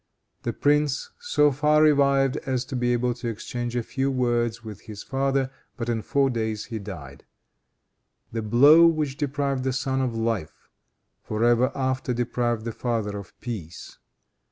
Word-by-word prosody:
The - - -2
prince 145 -1 +1
so 315 - +3
far 150 +2 +3
revived 140 -3 +4
as 130 -1 0
to 130 - -6
be 120 -1 +1
able 120 0 +1
to 120 0 -6
exchange 120 +2 -4
a 120 - 0
few 135 +4 -1
words 120 -3 0
with 110 -3 -9
his 105 -1 -9
father, 135 0 0 0.3
but 120 -1 -3
in 115 -2 0
four 135 +3 +1
days 110 -3 -2
he 115 -3 -5
died. 95 -8 -9 1.1
The 115 - -2
blow 145 +10 +7
which 155 -4 0
deprived 140 -2 -1
the 130 - 0
son 135 0 -1
of 125 -3 -1
life, 115 -8 -3 0.5
for 110 +1 -2
ever 120 +1 +4
after 130 -1 -1
deprived 120 -1 -1
the 115 - -2
father 110 -3 -2
of 100 -4 -10
peace. 100 -9 -7
125 Hz, 160 wpm, -25 LUFS, 115-135 Hz, 1.1 s, blow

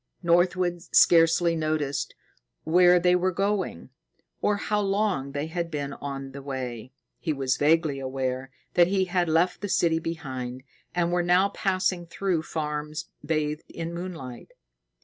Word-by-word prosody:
Northwood 175 0 +2
scarcely 165 0 +5
noted 155 -3 -1 0.7
where 180 +2 +5
they 180 +1 +4
were 185 +1 +1
going, 195 +2 -2 0.5
or 210 - +2
how 210 +1 0
long 195 -9 0
they 145 +1 -2
had 170 +1 -3
been 145 -3 -4
on 135 -1 -6
the 140 +1 -8
way. 130 -3 -5 0.3
He 160 - -2
was 135 -2 0
vaguely 155 -1 +2
aware 130 0 -3 0.2
that 175 - +6
they 190 +1 +1
had 180 -2 0
left 170 +4 +2
the 205 - -3
city 165 -3 +2
behind, 130 -6 -5 0.3
and 175 -1 +1
were 175 0 +2
now 180 +3 +3
passing 185 -3 -1
through 180 -1 -1
farms 150 -1 -4
bathed 150 0 -2
in 165 0 -5
moonlight. 170 - -7
165 Hz, 145 wpm, -26 LUFS, 145-180 Hz, 0.7 s, that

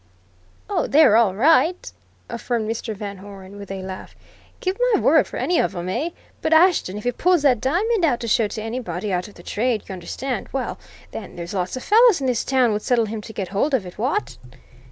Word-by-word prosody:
"Oh, - - -1
they're 285 -7 +5
all 220 -5 +3
right!" 325 - +3 0.4
affirmed 235 -1 -3
Mr. 225 0 -4
Van 200 -1 -6
Hoeren, 195 0 -11
with 200 - -9
a 195 -1 -5
laugh. 190 0 -8 0.4
"Give 370 0 -1 0.2
my - - +2
word - - +4
for - - -7
any 350 - +1
of - - 0
'em, 175 +1 -4
eh? 265 - -1 0.3
But 320 - +1
Ashton 320 - +3
if 210 - -7
he 245 - +1
pulls 350 +4 +2
that 255 -6 +3
diamond 380 - +1
out 270 -7 +2
to 230 - -4
show 225 -1 +2
to 215 +1 -6
anybody 210 -5 -4
out 180 0 -1
of 210 - -16
the - - -14
trade, 225 0 -1
you 195 - -6
understand 235 +9 -5
well, 270 -1 -3 0.3
then, 205 - -8
there's 170 +1 -7
lots 185 +4 -2
of 255 - -7
fellows 450 -2 +5
in 270 - -3
this 250 -4 0
town 255 -4 +2
would 210 - -2
settle 235 -1 +2
him 215 0 -5
to 220 - -10
get 195 -4 -5
hold 235 +9 +1
of 215 -7 -2
it 180 - -11
what?" 280 - -2
230 Hz, 220 wpm, -22 LUFS, 200-280 Hz, 0.4 s, they're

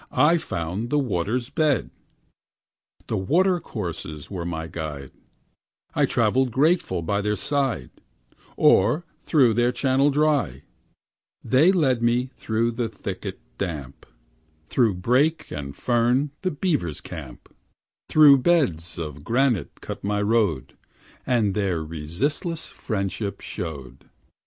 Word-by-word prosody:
I 165 +3 +4
found 90 - -4
the 150 - +1
water's 120 0 -1
bed. 150 -4 +1 1.1
The - - -2
watercourses 105 - -1
were 90 -4 -4
my 80 -2 -3
guide; 75 -4 -6 0.8
I - - +2
travelled 130 0 +2
grateful 135 - +1
by 100 +5 0
their 105 +1 0
side, 135 - -1 0.7
Or 155 +2 +4 0.2
through 130 -7 +4
their 120 +2 +2
channel 135 +2 +2
dry; 145 - +1 0.8
They 135 +10 +4
led 135 -10 +2
me 120 +2 +1
through 115 +1 0
the 115 0 -2
thicket 105 - -6 0.2
damp, 75 -8 -5 0.6
Through 110 +1 +2
brake 130 - +1
and 70 -1 -6
fern, 125 +4 +1
the 185 - 0
beavers' 145 - -1
camp, - - -10 0.6
Through 145 -3 +7
beds 95 - +1
of 75 -4 -6
granite 120 - 0
cut - - -7
my 105 +1 0
road, 105 - +1 0.5
And 115 -6 +2
their 95 -6 -1
resistless 95 - -3
friendship 100 -1 -3
showed. 70 -7 -7
115 Hz, 115 wpm, -24 LUFS, 85-140 Hz, 1.1 s, Through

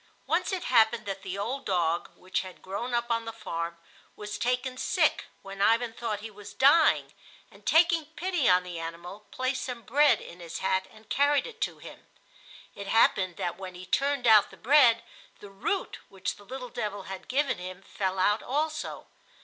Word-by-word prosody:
Once - - 0
it 370 -2 -2
happened 230 -3 +3
that 195 -1 -4
the 190 0 -5
old 255 +7 -3
dog, 175 -4 0
which 185 +1 -2
had 185 -1 -11
grown 200 +6 -4
up 235 0 -1
on 230 0 0
the 225 - -4
farm, 170 -6 -5 0.4
was 210 0 -6
taken 250 +2 0
sick, - - +1 0.2
when 195 0 -7
Ivan 230 +2 +3
thought 225 -3 -3
he 220 0 -7
was 205 0 -12
dying, 300 +4 +4 0.4
and, - - -17
taking 330 -1 +4
pity 345 - +1
on 180 0 +5
the 175 -2 -6
animal, 170 +5 -8
placed 255 0 -2
some 245 -2 -6
bread 285 +6 +4
in 175 - -11
his 170 -2 -6
hat 190 0 0
and 215 0 -18
carried 285 0 +2
it 460 -1 -10
to - - -1
him. - - -13 0.7
It 200 - -8
happened 190 -4 +3
that 175 +1 -3
when 185 -1 -7
he 180 +1 -9
turned 275 +3 0
out 215 -3 +7
the - - -15
bread 250 -3 +5 0.4
the 205 - -12
root 200 - -3
which 195 -1 -4
the 205 - -16
little 255 +2 -7
devil 210 -5 -4
had 190 0 -8
given 275 -4 0
him 185 +1 -8
fell 190 -1 -3
out 205 +3 +2
also. 305 +3 -3
215 Hz, 190 wpm, -28 LUFS, 190-255 Hz, 0.7 s, out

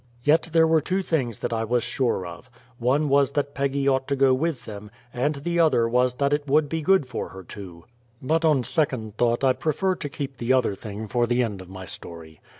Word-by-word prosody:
Yet 155 +4 +3
there 165 0 +5
were 160 -1 +3
two 190 +6 -1
things 130 - -1
that - - -3
I 115 0 -1
was 120 +1 0
sure 120 -5 -1
of: 85 +9 -10 0.3
one 135 +5 +2
was 140 0 +3
that 145 -1 -1
Peggy 140 0 -1
ought 135 -1 +1
to 140 - 0
go 135 -1 +4
with 150 +1 -1
them, 105 -1 -8 0.2
and 145 +5 0
the 170 +5 -2
other 150 -8 +4
was 125 +1 +2
that 140 +2 +1
it 145 0 -1
would 150 +2 +3
be 160 +2 -3
good 190 -1 +3
for 125 -2 -5
her 95 0 -10
to 85 -2 -10 0.3
but 160 +5 0
on 150 -5 +3
second 125 - -1
thought 120 +2 +1
I 130 -1 +4
prefer 160 +8 0
to 150 -5 -6
keep 140 -1 -6
the 120 +2 +1
other 125 -5 +2
thing 105 +2 -7
for 120 +2 +1
the 120 +1 +2
end 105 -5 -4
of 90 - -12
my 95 0 -8
story. 80 -3 -10
130 Hz, 230 wpm, -24 LUFS, 115-150 Hz, 0.3 s, there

